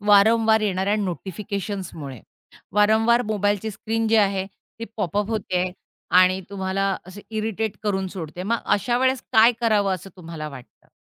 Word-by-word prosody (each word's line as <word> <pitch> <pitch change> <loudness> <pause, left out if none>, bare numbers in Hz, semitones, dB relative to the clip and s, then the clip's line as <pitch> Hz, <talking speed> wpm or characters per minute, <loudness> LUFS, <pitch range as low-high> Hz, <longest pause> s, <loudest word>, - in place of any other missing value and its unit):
वारंवार 220 +2 +5
येणाऱ्या 200 0 0
नोटिफिकेशन्समुळे, 190 - -5 0.5
वारंवार 220 +4 +4
मोबाईलची 205 0 0
स्क्रीन 225 +2 -2
जी 225 - +4
आहे 195 -2 +2 0.3
ती 230 - -4
पॉपअप 205 +1 -1
होतेय 185 -4 -1 0.5
आणि 185 +1 +3
तुम्हाला 195 0 -1
असे 190 +2 -10
इरिटेट 220 -1 -2
करून 195 -2 0
सोडते. 175 -1 -7
मग 230 +4 +1
अशा 240 +4 +1
वेळेस 260 0 +1
काय 225 +2 +7
करावं 205 -4 +2
असं 185 +2 -9
तुम्हाला 165 -3 -7
वाटतं? 130 -4 -14
200 Hz, 135 wpm, -23 LUFS, 185-220 Hz, 0.5 s, काय